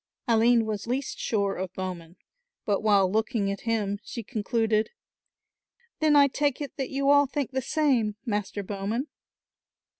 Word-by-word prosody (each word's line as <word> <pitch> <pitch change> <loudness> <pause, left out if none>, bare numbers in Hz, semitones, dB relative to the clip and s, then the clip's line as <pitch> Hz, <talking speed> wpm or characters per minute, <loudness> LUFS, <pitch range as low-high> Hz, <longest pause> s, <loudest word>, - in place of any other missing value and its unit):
Aline 230 0 +4
was 215 -1 -4
least 260 +3 -2
sure 200 -3 0
of 185 0 -4
Bowman, 180 -3 -6 0.5
but 200 -2 +1
while 200 -3 +4
looking 220 -1 0
at 200 - -5
him 205 -3 0
she 235 - -6
concluded; 220 -1 0 1.1
"Then 310 -1 +4
I 285 -1 +7
take 285 0 0
it 290 -2 -6
that 270 -2 -3
you 275 +1 +2
all 285 0 +5
think 280 -1 -3
the 265 0 -1
same, 250 -8 +1
Master 205 -2 -2
Bowman." 205 +8 -3
225 Hz, 150 wpm, -27 LUFS, 200-265 Hz, 1.1 s, I